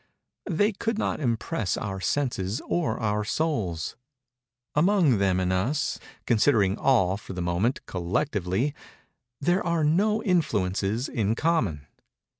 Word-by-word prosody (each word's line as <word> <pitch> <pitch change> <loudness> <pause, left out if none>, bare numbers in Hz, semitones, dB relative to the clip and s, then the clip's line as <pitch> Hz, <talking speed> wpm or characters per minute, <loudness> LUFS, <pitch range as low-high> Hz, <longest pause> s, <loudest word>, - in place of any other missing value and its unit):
They 205 +5 +2
could 225 +2 -2
not - - -1
impress 115 -6 -1
our 95 -2 -4
senses 115 -6 -1
or 175 -2 -1
our 105 -2 0
souls. 105 - -2 0.8
Among 160 - +3
them 95 -2 +2
and 95 0 0
us—considering 110 -1 +1
all, 100 -8 +3
for 100 - -9
the 90 - -5
moment, 90 +9 0
collectively—there 95 - -1 0.9
are 170 -2 +1
no 210 +8 +2
influences 110 - 0
in 110 -3 0
common. 115 - 0
115 Hz, 110 wpm, -26 LUFS, 95-155 Hz, 0.9 s, Among